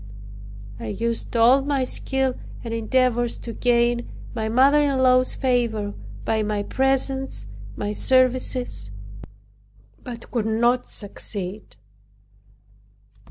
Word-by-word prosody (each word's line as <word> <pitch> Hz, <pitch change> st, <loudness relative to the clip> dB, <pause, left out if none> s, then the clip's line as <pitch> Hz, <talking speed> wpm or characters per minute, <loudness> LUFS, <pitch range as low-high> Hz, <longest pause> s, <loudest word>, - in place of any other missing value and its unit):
I 115 Hz, -, -6 dB
used 230 Hz, -, -2 dB
all 245 Hz, +4 st, +6 dB
my 275 Hz, -1 st, 0 dB
skill 265 Hz, 0 st, +1 dB, 0.3 s
and 230 Hz, -1 st, -4 dB
endeavors 240 Hz, +1 st, +1 dB
to 230 Hz, -, -7 dB
gain 240 Hz, 0 st, +1 dB, 0.2 s
my 220 Hz, -2 st, -2 dB
mother 270 Hz, +6 st, +5 dB
in 280 Hz, -2 st, +1 dB
law's 255 Hz, 0 st, +4 dB
favor 235 Hz, -6 st, 0 dB, 0.3 s
by 220 Hz, -1 st, +1 dB
my 210 Hz, -1 st, -1 dB
presents, 270 Hz, -, -1 dB, 0.3 s
my 205 Hz, -, -3 dB
services; 255 Hz, -, +1 dB, 1.1 s
but 235 Hz, -2 st, -9 dB
could 225 Hz, -3 st, -1 dB
not 240 Hz, +3 st, +2 dB
succeed. 200 Hz, -1 st, -6 dB
240 Hz, 105 wpm, -23 LUFS, 220-260 Hz, 1.1 s, all